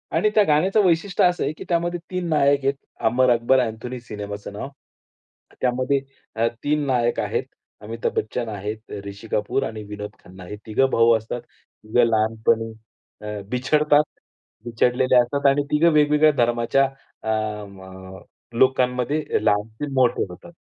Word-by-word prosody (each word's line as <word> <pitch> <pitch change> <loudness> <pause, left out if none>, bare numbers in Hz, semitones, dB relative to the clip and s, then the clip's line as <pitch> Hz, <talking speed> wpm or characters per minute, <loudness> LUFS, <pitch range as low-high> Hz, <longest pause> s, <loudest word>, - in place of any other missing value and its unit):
आणि 215 - +3
त्या 215 - +6
गाण्याचं 185 +7 +3
वैशिष्ट्य 180 +2 +2
असं 180 0 +1
आहे 145 - -1
की - - -9
त्यामध्ये 175 0 0
3 180 -1 -2
नायक 140 -2 +3
आहेत. 140 - +2 0.3
अमर 125 +2 +4
अकबर 120 +3 +3
अँथोनी 120 +1 -3
सिनेमाचं 105 -2 -7
नाव. 105 +6 -6 0.9
त्यामध्ये 130 +2 +1 0.3
अ, 115 +1 +2 0.2
3 150 0 +1
नायक 120 -3 +1
आहेत. - - -1 0.4
अमिताभ 115 +2 -3
बच्चन 115 +1 -2
आहेत, 105 +1 -4 0.3
ऋषी 100 +3 -9
कपूर 105 +6 0
आणि 110 -1 -5
विनोद 105 0 -6
खन्ना 95 0 -13
हे 105 - -7
तिघं 125 +5 +2
भाऊ 115 0 +4
असतात. 115 +2 -6
तिघं 120 0 -3
लहानपणी 115 0 +1 0.5
अ, 105 -1 -5
बिछडतात. 150 +4 +3 0.6
बिछडलेले 125 +2 +2
असतात 125 +4 +2
आणि 140 +1 +3
तिघं 165 +3 +4
वेगवेगळ्या 150 +1 +5
धर्माच्या 120 +3 +2 0.5
अम 105 -2 -3 0.8
लोकांमध्ये 130 +2 +2 0.3
लहानाचे 110 +6 0
मोठे 130 -2 +2
होतात. 90 - -12
125 Hz, 140 wpm, -23 LUFS, 110-145 Hz, 0.9 s, त्या